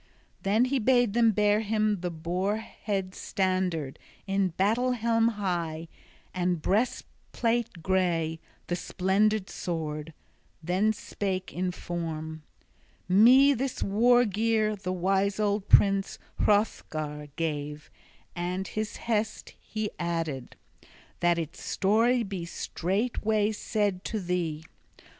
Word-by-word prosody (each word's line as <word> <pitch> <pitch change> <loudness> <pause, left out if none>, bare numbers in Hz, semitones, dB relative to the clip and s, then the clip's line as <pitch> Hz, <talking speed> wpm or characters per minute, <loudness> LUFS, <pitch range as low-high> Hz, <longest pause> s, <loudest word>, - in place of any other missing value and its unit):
Then 215 +5 +3
he 265 +1 0
bade 245 -2 +3
them 230 0 +5
bear 210 0 +3
him 215 -1 +1
the 180 0 -2
boar 175 +5 -1
head 195 -4 -4
standard, 185 -9 -1 0.3
the 195 0 +1
battle 230 +6 +2
helm 230 -1 +2
high, 170 -7 -2 0.4
and 180 -1 0
breastplate 230 +1 -1
gray, 170 -4 +1 0.3
the 175 - -1
splendid 195 +3 +1
sword; 155 -2 -4 0.5
then 185 +6 +2
spake 190 -3 -4
in 185 +1 -1
form: 160 -3 -5 0.7
"Me 250 +9 +7
this 265 0 -2
war 240 +5 +4
gear 215 +1 +1
the 195 -2 -4
wise 195 +2 +1
old 205 -1 0
prince, 195 0 +4 0.2
Hrothgar, 155 -8 0
gave, 150 -2 -4 0.4
and 180 +2 -3
his 215 0 -3
hest 220 -2 -1
he 215 -1 -4
added, 165 -7 -3 0.6
that 175 0 +3
its 165 -1 -5
story 230 +5 +2
be 195 -4 -5
straightway 210 +5 -1
said 205 -3 -1
to 220 - -2
thee. 175 -4 -2
195 Hz, 110 wpm, -28 LUFS, 175-215 Hz, 0.7 s, Me